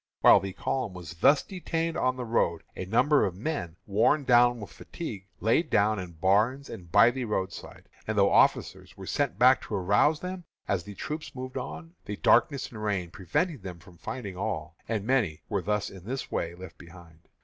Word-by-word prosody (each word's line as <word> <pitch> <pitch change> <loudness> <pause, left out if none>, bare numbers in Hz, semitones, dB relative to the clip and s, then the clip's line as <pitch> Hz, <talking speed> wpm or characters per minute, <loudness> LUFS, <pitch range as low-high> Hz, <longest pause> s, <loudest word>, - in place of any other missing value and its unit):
While - - +8
the 95 -1 -6
column 115 -5 -3
was 90 -2 -8
thus 140 - +4
detained 165 -3 -3
on 130 -6 +1
the 125 - -4
road 85 -8 0
a 95 - -5
number 140 - +3
of 95 -4 -1
men, 95 - -4
worn 110 +9 +2
down 120 -1 +4
with 105 - -9
fatigue, 105 - -8
laid 115 - +2
down 105 +1 +2
in 90 -2 -7
barns 105 - +1
and 85 -3 -10
by 115 +6 +6
the 130 0 -4
roadside, 95 -4 -5 0.2
and 110 0 -2
though 100 0 +4
officers - - +2
were - - -8
sent 90 - -1
back 125 +1 +5
to 105 - -5
arouse 105 - +3
them 180 +1 -6 0.2
as 95 -4 0
the 100 0 -10
troops 155 - -6
moved 130 0 -7
on, 80 -9 -6
the 105 - -4
darkness 135 +6 +3
and 110 -2 -8
rain 95 -5 -1
prevented 125 - -2
them 90 -2 -7
from 85 0 -18
finding 100 -7 -6
all, 85 -5 -4
and 110 -3 -1
many 110 -11 0
were 100 - 0
in 100 -1 -3
this 130 +4 -5
way 85 +1 -2
left 90 0 -11
behind. 85 -1 -15
105 Hz, 195 wpm, -28 LUFS, 90-130 Hz, 0.2 s, While